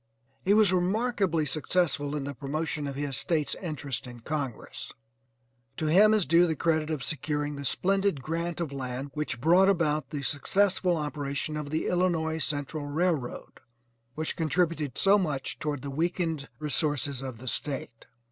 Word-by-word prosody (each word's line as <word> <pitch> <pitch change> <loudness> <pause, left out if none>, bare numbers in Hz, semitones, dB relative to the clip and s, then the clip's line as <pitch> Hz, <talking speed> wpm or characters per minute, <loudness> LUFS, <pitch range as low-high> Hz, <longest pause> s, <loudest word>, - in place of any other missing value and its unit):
He 200 +2 +4
was 210 -4 +5
remarkably 185 -3 +1
successful 150 -2 0
in 145 - -2
the 140 +1 -4
promotion 150 +3 -3
of 140 - -4
his 140 -1 -2
State's 155 0 +1
interest 145 - -4
in 120 -1 -10
Congress. 140 -3 -4 0.9
To 155 - -2
him 195 +8 +6
is 215 -5 +3
due 170 +4 +5
the 160 - 0
credit 160 0 +1
of 155 -5 -2
securing 145 +1 -2
the 140 - -6
splendid 195 +3 +1
grant 165 +4 -3
of 165 -4 -2
land 135 0 -4
which 150 -5 -2
brought 175 +8 +5
about 155 -6 +1
the 145 -2 -4
successful 180 +4 +2
operation 150 0 -3
of 150 -1 -4
the 155 +2 -1
Illinois 165 -3 +1
Central 145 0 -2
railroad 155 -4 -1 0.6
which 155 +1 -2
contributed 160 -4 0
so 200 +1 +5
much 150 -8 -2
toward 145 -3 -2
the 140 - -4
weakened 165 -1 -1
resources 145 -3 0
of 130 -3 -6
the 130 +3 -10
State. 130 -3 -3
155 Hz, 155 wpm, -28 LUFS, 140-175 Hz, 0.9 s, him